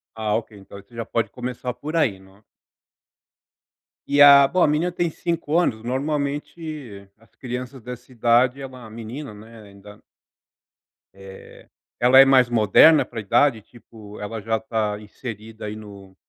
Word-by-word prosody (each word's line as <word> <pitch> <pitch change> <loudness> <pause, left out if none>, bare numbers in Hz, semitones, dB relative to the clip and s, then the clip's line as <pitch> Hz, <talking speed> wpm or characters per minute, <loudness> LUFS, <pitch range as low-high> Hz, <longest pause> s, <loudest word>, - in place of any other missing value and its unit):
Ah, 110 -1 -2
ok, 110 -2 -6
então 100 +1 -13
você 100 +4 -23
já 115 0 -5
pode 115 +1 -2
começar 125 0 -5
por 155 +5 -6
aí, 115 -12 +1
né. 95 +2 -21 1.6
E 145 0 +1
a 140 -1 +9
bom, 180 +4 +1
a - - +5
menina 155 +4 0
tem 175 -1 -1
5 170 -1 -2
anos. 110 -11 0
Normalmente, 140 - -5
as 115 - -27
crianças 125 0 -7
dessa 125 +2 -10
idade 120 +3 +2
é 135 - -6
uma 130 -3 -12
menina, 115 +3 -8
né, 110 +2 -14
ainda 100 +1 -15 1.1
Eh, 95 0 -14 0.3
ela 125 +2 +6
é 135 - +9
mais 130 -2 +4
moderna 120 +7 +5
para 120 - -10
a - - -3
idade, 115 +2 +2
tipo, 110 -3 -15
ela 105 +2 -6
já 110 +2 -1
está 110 -2 -3
inserida 110 0 -9
aí 105 - -5
no 100 -3 -13
120 Hz, 160 wpm, -22 LUFS, 105-135 Hz, 1.6 s, a